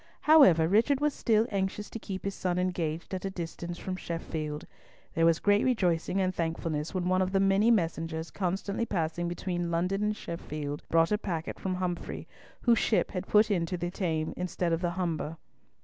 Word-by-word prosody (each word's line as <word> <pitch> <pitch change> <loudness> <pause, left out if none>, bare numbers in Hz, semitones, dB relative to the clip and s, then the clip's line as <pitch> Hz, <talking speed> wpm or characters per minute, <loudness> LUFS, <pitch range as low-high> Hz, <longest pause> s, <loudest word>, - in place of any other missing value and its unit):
However 190 - +7
Richard 230 - +3
was 295 0 +1
still 220 -1 +2
anxious 195 +1 -2
to 230 - -5
keep 195 -3 -6
his 200 - -1
son 180 -2 -1
engaged 175 -2 -2
at 185 - -3
a 195 - -1
distance 175 -1 -6
from 185 0 -4
Sheffield. 160 -4 -4 0.5
There 165 0 +3
was 165 -1 +4
great 205 +3 +3
rejoicing 185 -7 +1
and 185 -1 +1
thankfulness 165 -2 -2
when 180 -1 0
one 185 0 +3
of 185 0 0
the 195 - +4
many 195 +3 +4
messengers 165 -5 0
constantly 195 +4 -2
passing 170 -1 -1
between 175 0 -2
London 180 +4 0
and 210 0 +1
Sheffield 150 -3 -5
brought 165 +2 +3
a 210 - +2
packet 165 -6 -4
from 185 -1 -2
Humfrey, 180 -1 -4 0.3
whose 235 -2 +4
ship 220 - +1
had 185 0 -4
put 215 +1 +4
into 180 -1 0
the 175 +1 -3
Thames 160 -5 -1
instead 180 -1 -1
of 165 - 0
the 175 - +1
Humber. 165 -3 -2
180 Hz, 185 wpm, -29 LUFS, 165-195 Hz, 0.5 s, However